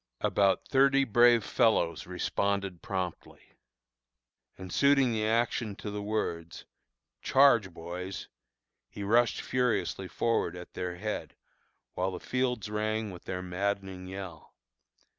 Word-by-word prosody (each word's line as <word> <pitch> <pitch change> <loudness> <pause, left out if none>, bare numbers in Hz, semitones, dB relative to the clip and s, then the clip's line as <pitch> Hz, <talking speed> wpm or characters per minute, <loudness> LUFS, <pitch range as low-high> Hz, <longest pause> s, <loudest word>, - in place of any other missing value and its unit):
About 100 -1 +2
thirty 135 0 +4
brave 120 -1 +5
fellows 85 -11 +1
responded 95 0 -1
promptly, 95 -3 -5 1.0
and 95 -1 -8
suiting 140 -3 +4
the 110 -1 0
action 115 -2 0
to 105 - -6
the 105 0 -4
words, 85 -6 -3 0.6
"charge, 120 -8 +4
boys!" 90 +3 -6 0.6
he 100 - -7
rushed 115 +3 +3
furiously 125 -6 -1
forward 115 -5 0
at 90 0 -10
their 90 -1 -4
head, 105 +4 -5 0.6
while 90 +1 -1
the 90 - -6
fields 125 -4 -1
rang 110 0 -2
with 90 - -11
their 90 0 -4
maddening 95 0 -3
yell. 95 -4 -9
100 Hz, 120 wpm, -30 LUFS, 90-115 Hz, 1.0 s, brave